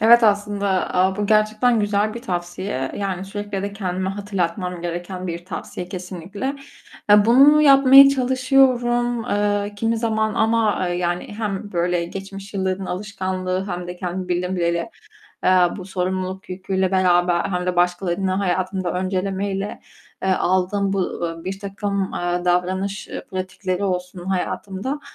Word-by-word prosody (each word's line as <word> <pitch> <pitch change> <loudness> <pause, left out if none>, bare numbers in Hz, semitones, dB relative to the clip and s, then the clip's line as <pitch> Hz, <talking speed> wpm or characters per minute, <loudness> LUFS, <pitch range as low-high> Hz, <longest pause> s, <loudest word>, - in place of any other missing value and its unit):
Evet, 230 +2 +7
aslında 205 -2 +1
a, 190 +2 +2
bu 205 - -1
gerçekten 215 +2 +3
güzel 205 +1 0
bir 235 - -7
tavsiye, 175 - -3
yani, 195 -2 -3
sürekli 205 0 -5
de 200 - -3
kendime 190 -2 -2
hatırlatmam 180 -3 -3
gereken 175 +2 -4
bir 170 0 -5
tavsiye 180 -1 -6
kesinlikle. 185 - -5 0.6
Eee, 205 0 +7
bunu 275 +6 +6
yapmaya 275 -1 +8
çalışıyorum, 250 -2 +2
eee, 205 -1 0
kimi 225 +2 0
zaman 220 -2 0
ama, 220 -4 +2
eee, 175 - -1
yani, 175 0 -1
hem 205 -1 -3
böyle 175 0 0
geçmiş 195 +2 -8
yılların 190 0 -1
alışkanlığı 185 -1 -3
hem 175 -1 -4
de 180 - -6
kendimi 180 +1 -4
bildim 180 +1 -1
bileli, 170 -1 0 0.5
eee, - - +4 0.3
bu 185 - -7
sorumluluk 185 0 -3
yüküyle 190 0 -1
beraber, 175 -2 +3
hem 180 -2 -2
de 180 - -1
başkalarını 180 +1 +1
hayatımda 185 -1 -1
öncelemeyle, 195 +2 -2 0.4
eee, 190 - 0
aldığım 190 +2 +1
bu, 195 - 0
ııı, 165 -2 -4
birtakım, 195 0 -3
eee, 175 0 -1
davranış, 190 +3 0
eee, - - -6
pratikleri 185 0 -3
olsun 180 -1 -3
hayatımda, 195 +7 -3
190 Hz, 140 wpm, -21 LUFS, 180-205 Hz, 0.6 s, yapmaya